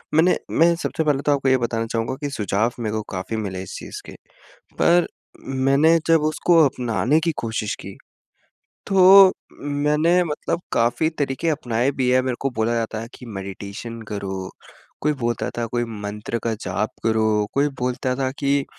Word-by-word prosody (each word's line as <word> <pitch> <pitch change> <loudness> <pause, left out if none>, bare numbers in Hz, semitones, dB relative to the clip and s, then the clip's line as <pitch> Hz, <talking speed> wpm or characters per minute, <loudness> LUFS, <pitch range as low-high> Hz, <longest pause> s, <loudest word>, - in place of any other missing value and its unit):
मैंने 165 +3 +4 0.2
मैं 170 +1 +6
सबसे 160 - -1
पहले 145 -3 +1
तो 145 - +3
आपको 135 -1 +1
ये 130 - +5
बताना 115 -2 -1
चाहूँगा 115 +3 -1
कि 145 - -2
सुझाव 110 -2 0
मेरे 110 -2 -2
को 110 - -1
काफ़ी 95 +4 -4
मिले 95 -3 -4
इस 95 - -9
चीज़ - - -8
के। - - -10 0.7
पर 175 0 +4 0.6
मैंने 150 +5 +5
जब 165 -1 +5
उसको 170 +2 +2
अपनाने 125 - +1
की 165 - +2
कोशिश 110 -2 -2
की 100 - -8 0.9
तो 195 0 +8 0.3
मैंने 150 +5 +2
मतलब 155 +2 -3
काफ़ी 120 +7 +2
तरीके 145 +3 -1
अपनाए 125 -3 0
भी 125 - +2
हैं 130 - +4
मेरे 130 -1 -1
को 135 - 0
बोला 115 +1 +1
जाता 115 -1 -2
है 115 - -7
कि 125 - -12
मेडिटेशन 100 +2 -7
करो, 95 -2 -4 0.5
कोई 150 +1 +2
बोलता 120 -1 -1
था 120 - -1
कोई 120 +1 -1
मंत्र 105 +1 -5
का 115 - 0
जाप 95 +4 -2
करो, 110 -2 +2
कोई 145 +1 +2
बोलता 125 +1 -1
था 130 0 -1
कि 140 0 +1
120 Hz, 170 wpm, -22 LUFS, 110-145 Hz, 0.9 s, तो